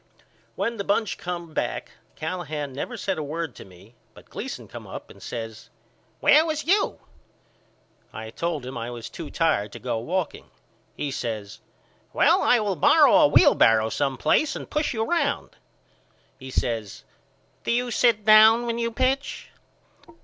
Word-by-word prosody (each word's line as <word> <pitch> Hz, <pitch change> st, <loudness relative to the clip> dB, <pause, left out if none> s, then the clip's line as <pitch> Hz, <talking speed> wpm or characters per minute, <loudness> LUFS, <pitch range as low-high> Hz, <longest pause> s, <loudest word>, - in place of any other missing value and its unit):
When 235 Hz, 0 st, -2 dB
the 200 Hz, -, -3 dB
bunch 205 Hz, +2 st, 0 dB
come 175 Hz, -2 st, -6 dB
back -, -, -3 dB, 0.2 s
Callahan 155 Hz, -4 st, -4 dB
never 230 Hz, -, -5 dB
said 190 Hz, -5 st, -2 dB
a -, -, -3 dB
word 160 Hz, +3 st, -4 dB
to -, -, -12 dB
me 95 Hz, +4 st, -17 dB, 0.2 s
but -, -, -17 dB
Gleason -, -, -6 dB
come -, -, -10 dB
up -, -, -9 dB
and -, -, -16 dB
says 115 Hz, -2 st, -7 dB, 0.5 s
Where 300 Hz, +2 st, +6 dB
was 310 Hz, -2 st, -3 dB
you? 400 Hz, +5 st, +1 dB, 1.1 s
I 110 Hz, 0 st, -8 dB
told 160 Hz, -2 st, -3 dB
him 130 Hz, -, -7 dB
I 115 Hz, +1 st, -4 dB
was 120 Hz, -2 st, -8 dB
too 165 Hz, -3 st, -7 dB
tired 105 Hz, -, 0 dB
to -, -, -7 dB
go 120 Hz, -2 st, -2 dB
walking. 175 Hz, +8 st, -3 dB, 0.5 s
He 145 Hz, -, -3 dB
says 110 Hz, -5 st, -5 dB, 0.5 s
Well -, -, +4 dB
I 245 Hz, -, +4 dB
will 205 Hz, -3 st, -1 dB
borrow 295 Hz, -, +5 dB
a 300 Hz, -1 st, +7 dB
wheelbarrow 115 Hz, -, +5 dB
some 135 Hz, +1 st, -1 dB
place 305 Hz, -, +2 dB
and -, -, -7 dB
push 300 Hz, 0 st, -1 dB
you 220 Hz, -1 st, -1 dB
round. 345 Hz, +8 st, -1 dB, 0.9 s
He 130 Hz, -1 st, -9 dB
says 115 Hz, -5 st, -3 dB, 0.6 s
Do -, -, -4 dB
you 245 Hz, +1 st, 0 dB
sit 225 Hz, -3 st, +2 dB
down 220 Hz, +2 st, +7 dB
when 235 Hz, 0 st, -2 dB
you 230 Hz, 0 st, 0 dB
pitch? 260 Hz, +4 st, -1 dB
175 Hz, 160 wpm, -24 LUFS, -, 1.1 s, a